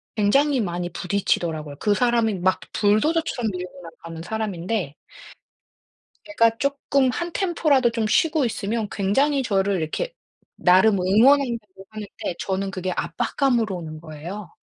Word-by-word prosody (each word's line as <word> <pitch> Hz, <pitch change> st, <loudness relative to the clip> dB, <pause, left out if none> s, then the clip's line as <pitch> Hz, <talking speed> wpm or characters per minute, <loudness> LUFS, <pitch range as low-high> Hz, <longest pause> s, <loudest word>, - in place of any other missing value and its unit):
굉장히 275 Hz, +7 st, +3 dB
많이 175 Hz, -3 st, -3 dB
부딪히더라고요. 165 Hz, -6 st, -1 dB
그 210 Hz, -, +2 dB
사람이 235 Hz, -1 st, +2 dB
막 185 Hz, +1 st, +2 dB
불도저처럼 240 Hz, +2 st, +1 dB
밀고 180 Hz, 0 st, -7 dB
나가는 165 Hz, 0 st, -10 dB
사람인데 195 Hz, -5 st, -3 dB, 1.3 s
제가 230 Hz, -7 st, +2 dB
쪼끔 280 Hz, -1 st, +1 dB
한 345 Hz, +6 st, -4 dB
템포라도 310 Hz, -10 st, +2 dB
좀 230 Hz, -1 st, -1 dB
쉬고 310 Hz, +6 st, +2 dB
있으면 220 Hz, -1 st, -2 dB
굉장히 270 Hz, +9 st, +1 dB
저를 200 Hz, -4 st, +1 dB
이렇게 485 Hz, -, -3 dB, 0.4 s
나름 190 Hz, +3 st, +4 dB
응원한다고 220 Hz, -1 st, +2 dB
하는데 210 Hz, -4 st, -6 dB
저는 195 Hz, 0 st, -2 dB
그게 185 Hz, -1 st, -3 dB
압박감으로 220 Hz, -, 0 dB
오는 155 Hz, -3 st, -7 dB
거예요. 170 Hz, +5 st, -8 dB
210 Hz, 320 characters per minute, -23 LUFS, 180-250 Hz, 1.3 s, 나름